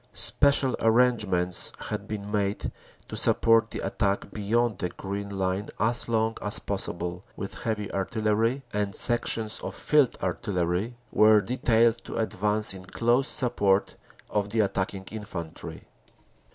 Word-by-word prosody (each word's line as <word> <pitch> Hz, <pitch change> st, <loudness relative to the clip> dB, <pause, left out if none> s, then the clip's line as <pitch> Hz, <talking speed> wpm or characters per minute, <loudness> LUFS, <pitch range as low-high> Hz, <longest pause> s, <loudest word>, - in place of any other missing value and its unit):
Spe 120 Hz, +9 st, +6 dB
cial 140 Hz, -2 st, +2 dB
arrangements 110 Hz, -7 st, +2 dB, 0.2 s
had -, -, -5 dB
been 105 Hz, -1 st, -6 dB
made 100 Hz, -1 st, -2 dB, 0.4 s
to -, -, -7 dB
support 115 Hz, 0 st, +3 dB
the -, -, -6 dB
attack 100 Hz, -1 st, -2 dB
beyond 110 Hz, +1 st, -1 dB
the 90 Hz, -, -2 dB
Green 100 Hz, +2 st, -6 dB
Line 95 Hz, +2 st, -2 dB
as 120 Hz, +3 st, 0 dB
long 110 Hz, 0 st, 0 dB
as 105 Hz, +2 st, +2 dB
possible 90 Hz, -2 st, -4 dB
with 100 Hz, -, -6 dB
heavy 105 Hz, -3 st, -3 dB
artillery, 110 Hz, +6 st, -1 dB
and 105 Hz, -1 st, -1 dB
sections 115 Hz, -2 st, +5 dB
of -, -, -7 dB
field 150 Hz, -5 st, +2 dB
artillery 90 Hz, +4 st, -2 dB
were 110 Hz, 0 st, +5 dB
detailed 115 Hz, +1 st, +1 dB
to -, -, -6 dB
advance 105 Hz, -1 st, -1 dB
in 95 Hz, -1 st, -11 dB
close 120 Hz, +7 st, 0 dB
support 105 Hz, -9 st, +1 dB, 0.3 s
of 105 Hz, -1 st, -2 dB
the 110 Hz, +1 st, +1 dB
attacking 95 Hz, -1 st, -3 dB
infantry. 95 Hz, -7 st, -7 dB
105 Hz, 135 wpm, -26 LUFS, 100-115 Hz, 0.4 s, Spe